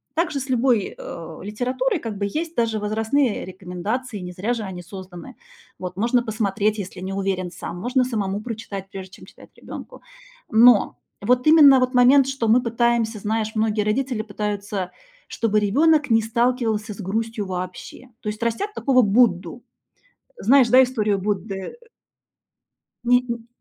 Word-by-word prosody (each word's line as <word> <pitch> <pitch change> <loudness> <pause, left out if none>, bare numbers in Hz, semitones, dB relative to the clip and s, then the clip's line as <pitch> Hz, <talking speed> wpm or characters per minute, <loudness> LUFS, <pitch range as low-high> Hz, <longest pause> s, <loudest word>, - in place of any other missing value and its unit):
Так 335 +1 +1
же 280 - -2
с 270 0 -7
любой, 245 -4 +1
э, 165 -1 -8
литературой 255 - -1
как 225 -6 -6
бы 200 - -1
есть 320 +11 -4
даже 225 -2 0
возрастные 220 +4 0
рекомендации, 195 +6 -5
не 180 -1 -7
зря 205 +7 -1
же 230 -2 -4
они 190 -3 -6
созданы. 185 +5 -10 0.4
Вот 180 -1 -6
можно 240 +3 +2
посмотреть, 215 -1 -1
если 185 -2 -7
не 190 +1 -4
уверен 190 -2 -2
сам, 175 - -7
можно 250 +6 +1
самому 210 -5 -2
прочитать, 215 -4 -6
прежде 190 -1 -8
чем - - -14
читать - - -17
ребёнку. - - -10 0.5
Но 230 -1 +5 0.2
вот 250 +4 +2
именно 295 -4 +8
вот 255 +1 0
момент, 255 +2 +6
что 270 -4 -2
мы 240 +3 +4
пытаемся, 230 -2 0
знаешь, 215 +1 -2
многие 215 -1 +1
родители 235 +1 -1
пытаются, 205 -3 -4 0.4
чтобы 215 -2 0
ребёнок 295 +9 +3
не 225 -1 +4
сталкивался 225 -2 0
с - - -17
грустью 220 +2 -3
вообще. 185 +7 -7
То 210 - -3
есть 210 +1 -6
растят 315 - -2
такого 260 -8 +3
Будду. 205 -1 +2 0.7
Знаешь, 270 - +5
да, 260 +1 +7
историю 215 -5 0
Будды? 195 - -4 1.3
Не 245 +1 +4
н 235 -2 -6
220 Hz, 155 wpm, -22 LUFS, 200-250 Hz, 1.3 s, именно